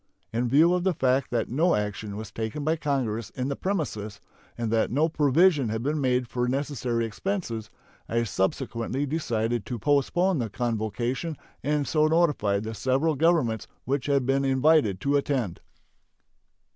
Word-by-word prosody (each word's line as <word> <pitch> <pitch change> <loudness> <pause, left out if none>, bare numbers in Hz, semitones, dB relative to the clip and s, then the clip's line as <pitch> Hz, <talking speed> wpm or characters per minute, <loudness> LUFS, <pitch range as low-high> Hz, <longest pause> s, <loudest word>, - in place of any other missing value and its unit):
In 120 +1 0
view 160 +7 +5
of 180 -1 0
the 190 -2 +1
fact 130 -1 +1
that 115 -2 0
no 165 +8 +2
action 105 0 -3
was 110 -1 -7
taken 110 +6 -4
by 160 +2 +2
Congress 125 -8 -2
in 130 +1 -3
the 140 - -1
premises 120 - -3 0.4
and 115 -2 -2
that 115 -1 +2
no 150 +6 +2
provision 150 -2 +3
had 110 +1 -2
been 150 +2 0
made 125 -2 +1
for 125 +1 -1
necessary 130 -3 -1
expenses, 115 - -3 0.4
I 115 +1 +1
subsequently 115 +6 -1
decided 120 -7 -1
to 125 - -3
postpone 150 - +2
the 115 -3 -2
convocation, 120 - -2 0.3
and 145 0 0
so 155 -1 +3
notified 150 -12 +2
the 110 +1 -4
several 135 +8 +1
Governments 150 - +1 0.2
which 135 +2 -1
had 140 -3 +2
been 135 +1 +2
invited 135 - +3
to 140 +1 +2
attend. 130 -10 -1
130 Hz, 160 wpm, -26 LUFS, 115-150 Hz, 0.4 s, view